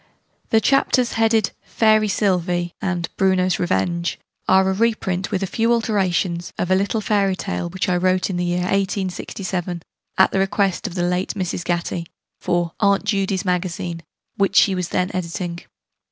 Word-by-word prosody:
The 225 - +4
Chapters, 255 +1 +2
headed 225 -2 +2
'Fairy 215 -1 +3
Sylvie' 180 -3 0
and 175 -4 -1
'Bruno's 185 -1 +2
Revenge,' 175 -1 0 0.3
are 190 0 +5
a 190 - +2
reprint, 195 -3 0
with 195 - -1
a - - +1
few 225 +5 0
alterations, 190 -6 0
of 180 - -1
a - - +6
little 200 +3 0
fairy 200 -2 +1
tale 90 - -3
which 190 +2 -2
I 180 -1 +2
wrote 185 +1 +2
in 185 - -3
the 175 - 0
year 175 0 0
1867, 185 -2 -2 0.3
at 190 - +5
the 195 - 0
request 195 +1 0
of 185 - -8
the 175 - 0
late 180 +3 -1
Mrs. 180 -2 -3
Gatty, 170 -1 -2 0.3
for 175 -1 0
'Aunt 200 -2 +3
Judy's 195 -2 0
Magazine,' 175 -2 -2 0.4
which 200 -1 +1
she 200 - +6
was 180 -2 -2
then 180 +1 0
editing. 170 -1 -3
185 Hz, 165 wpm, -21 LUFS, 175-200 Hz, 0.4 s, a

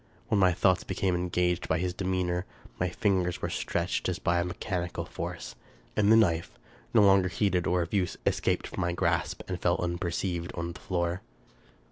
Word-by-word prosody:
When 105 - +3
my 95 -2 +5
thoughts 95 +1 +2
became 95 0 -1
engaged 90 0 0
by 80 - +2
his 90 +1 -1
demeanor, 90 -1 -1 0.3
my 90 - +1
fingers 90 -3 0
were - - -3
stretched 85 +2 -1
as 90 - -1
by 85 -3 +1
a - - +2
mechanical 90 0 -3
force, - - -6 0.4
and 105 0 +4
the - - +8
knife, 85 -7 +2 0.3
no 110 -3 +5
longer 95 -1 +5
heeded 90 -1 +1
or 90 -1 +2
of 85 - -8
use, 95 -3 0
escaped - - +1
from - - -5
my 85 0 0
grasp - - 0
and 90 -1 -4
fell 85 - +2
unperceived 85 0 -2
on 85 0 -3
the - - -12
floor. 85 -1 -1
90 Hz, 180 wpm, -29 LUFS, 85-95 Hz, 0.4 s, the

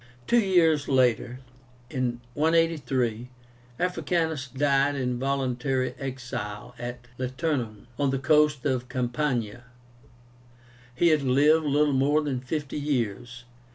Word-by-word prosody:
Two 240 - +4
years 165 -8 +3
later 125 -1 +1 0.5
(183), 130 -1 0 0.5
Africanus 165 -4 -1
died 140 +2 +1
in 125 -2 -2
voluntary 130 -1 -1
exile 125 -4 -6
at 120 0 -7
Liternum, 130 -4 -2
on 140 -1 +2
the 135 - 0
coast 150 0 +3
of 130 -2 -1
Campania. 125 -2 -2 1.3
He 170 +6 +4
had 155 -2 +3
lived 145 +4 +4
little 145 0 +2
more 145 +3 +2
than 135 -4 -2
fifty 145 +3 -4
years. 120 -4 -2
135 Hz, 105 wpm, -26 LUFS, 125-150 Hz, 1.3 s, Two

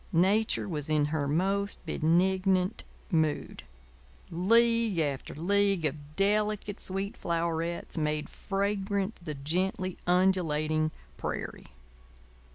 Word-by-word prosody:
Nature 200 +7 +3
was 150 -5 -3
in 150 -1 +3
her 145 -3 0
most 195 +7 0
benignant 185 +4 +2 0.3
mood. 160 -3 0 0.7
League 230 +3 +3
after 145 -5 -1
league 195 +1 +2
of 150 0 -4
delicate, 210 0 +1
sweet 195 +2 -2
flowerets 170 0 -2
made 150 0 -1
fragrant 200 +1 -2
the 155 -3 -4
gently 185 +6 -2
undulating 160 -4 +2 0.3
prairie. - - -5
180 Hz, 95 wpm, -29 LUFS, 155-200 Hz, 0.7 s, Nature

